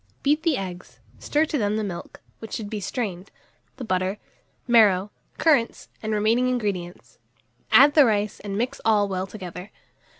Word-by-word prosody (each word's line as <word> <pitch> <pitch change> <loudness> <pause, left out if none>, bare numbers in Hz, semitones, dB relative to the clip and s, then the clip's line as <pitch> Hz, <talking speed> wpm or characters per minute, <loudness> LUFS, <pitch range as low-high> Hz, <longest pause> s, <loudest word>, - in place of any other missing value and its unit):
Beat 295 +2 +2
the 320 -4 +1
eggs, 185 -2 -7 0.2
stir 300 +2 +1
to 300 -2 -2
them 210 0 0
the 220 - -1
milk, 175 -4 -7 0.2
which 225 - -9
should 210 -2 -5
be 215 - -3
strained, 195 -3 -4 0.5
the 260 - -6
butter, 185 -2 -1 0.5
marrow, 210 -4 +4 0.3
currants, 280 -8 +1
and 220 - -3
remaining 220 +4 +2
ingredients; 200 -8 -4 0.5
add 290 +1 +7
the 295 -2 +7
rice, 210 -2 0
and 200 -1 -5
mix 255 +5 -2
all 210 -2 +3
well 190 -1 -3
together. 185 -1 -9
210 Hz, 160 wpm, -24 LUFS, 190-245 Hz, 0.5 s, add